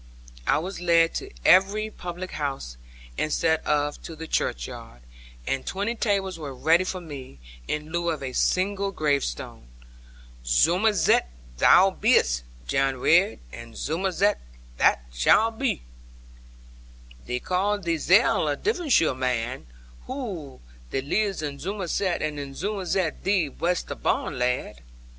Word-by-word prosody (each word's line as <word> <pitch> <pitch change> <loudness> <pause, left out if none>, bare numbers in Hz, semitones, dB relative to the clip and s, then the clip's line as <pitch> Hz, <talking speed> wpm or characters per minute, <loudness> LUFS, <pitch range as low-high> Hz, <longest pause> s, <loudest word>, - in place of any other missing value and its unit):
I - - +4
was 180 +3 -5
led 165 -1 +4
to - - -4 0.2
every 205 +3 +4
public 180 0 -7
house, 135 - -4 0.4
instead 160 +1 +1
of 145 -1 0
to 165 - -8
the 160 +1 -7
churchyard; - - -3 0.4
and 135 -1 -1
twenty 200 +4 -2
tables 195 -6 -1
were 140 -4 -6
ready 165 +7 +3
for 185 0 -3
me, 140 - -9 0.3
in 150 +1 -3
lieu 170 0 0
of 155 -4 -3
a 130 -1 -4
single 195 +5 +1
gravestone. 140 - -2 0.8
'Zummerzett 175 - +3 0.3
thou 190 - +6
bee'st, 185 - +2 0.2
Jan 135 - +1
Ridd, - - +3
and 115 -1 -10
Zummerzett 190 - 0 0.4
thou - - +5 0.2
shalt 220 - +3
be. 270 -3 -1 1.4
Thee 125 - -2
carl 190 +7 0
theezell 180 +1 +3
a 145 - -2
Davonsheer 335 - +2
man! 125 - -2 0.4
Whoy, 195 - -6 0.3
thee 135 - -1
lives 195 +4 -1
in 140 -2 -4
Zummerzett; 185 +1 -2
and 150 -1 -2
in 140 -1 -7
Zummerzett 190 -3 -2
thee 190 -6 +2
wast 175 +5 -1
barn, - - -1
lad.' 125 - -1
165 Hz, 125 wpm, -25 LUFS, 140-195 Hz, 1.4 s, thou